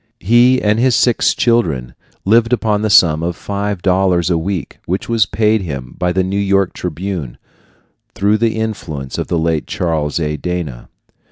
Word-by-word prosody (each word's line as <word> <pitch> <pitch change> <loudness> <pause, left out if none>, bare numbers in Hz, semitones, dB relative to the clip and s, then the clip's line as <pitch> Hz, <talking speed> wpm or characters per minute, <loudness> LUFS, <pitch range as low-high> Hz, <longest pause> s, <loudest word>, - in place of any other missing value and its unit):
He 120 +6 +4
and 105 0 +1
his 125 -1 +3
six 120 -2 +2
children 80 - 0 0.3
lived 115 +4 +3
upon 105 -3 +1
the 110 - 0
sum 80 -5 +5
of 85 0 -2
five 100 -1 -4
dollars 90 -2 +2
a - - +3
week, 90 -1 -4
which 95 +3 -2
was 115 -3 +2
paid 110 -1 +1
him 70 -8 -6
by 90 0 -1
the 95 +1 +1
New 95 +2 -2
York 100 -2 +1
Tribune, 90 -5 -5 0.8
through 105 0 +1
the 115 -1 +1
influence 85 -12 -4
of - - -3
the 85 - -1
late 80 -2 -1
Charles 80 -3 -1
A. 75 -1 -2
Dana. 85 -9 -5
95 Hz, 170 wpm, -16 LUFS, 80-110 Hz, 0.8 s, sum